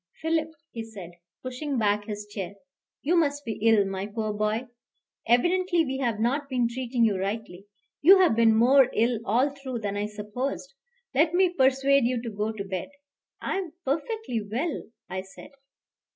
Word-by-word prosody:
"Philip," 320 0 0 0.2
he 230 - -5
said, 200 -6 -10 0.3
pushing 260 +2 -3
back 210 -2 +1
his 210 -1 -5
chair, 200 -2 -6 0.5
"you 335 +5 +2
must 290 -3 +1
be 220 - -4
ill, 220 -2 +5
my 195 0 -3
poor 215 0 -3
boy. 215 +3 -1 0.6
Evidently 345 - +3
we 265 -1 -3
have 235 -5 -1
not 275 +5 0
been 250 -3 +1
treating 240 0 0
you 200 -4 +1
rightly; 200 -1 -4 0.3
you 375 +7 +8
have 365 -11 +4
been 225 -1 +5
more 260 +3 +6
ill 230 0 +2
all 245 +7 +2
through 270 -3 -6
than 205 -1 -2
I 205 +1 -1
supposed. 215 +7 -5 0.4
Let 310 +5 +3
me 365 -1 +3
persuade 270 -2 +3
you 245 0 +1
to 230 - -4
go 210 +1 -2
to 215 -2 -5
bed." 190 +4 -4 0.5
"I - - -1
am 355 -5 -6
perfectly 305 - -2
well," 245 +11 -3 0.2
I 190 - -4
said. 190 +9 -13
240 Hz, 170 wpm, -26 LUFS, 210-280 Hz, 0.6 s, you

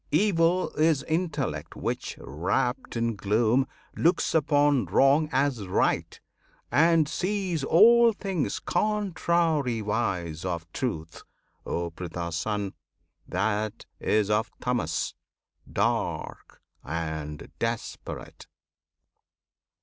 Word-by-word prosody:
Evil 175 +1 +2
is 155 -3 +3
Intellect 160 -5 -2
which, - - -3
wrapped 95 - -2
in 115 -1 0
gloom, 110 +6 +2 0.3
Looks 170 +2 +2
upon 145 -5 +3
wrong 140 - +4
as 130 -6 0
right, 90 - 0 0.5
and 160 +3 +4
sees 185 -2 -1
all 235 +10 +7
things 195 -7 -2
Contrariwise 125 - 0
of 85 -3 -3
Truth. 80 -11 -4 0.5
O 85 0 -2
Pritha's 85 0 -5
Son! 100 +2 -2 0.5
That 105 +2 -1
is 105 -1 +1
of 110 +2 +1
Tamas, 125 -1 -1 0.6
"dark" - - -2 0.2
and 80 -1 -5
desperate! 115 0 -5
125 Hz, 90 wpm, -27 LUFS, 100-165 Hz, 0.6 s, all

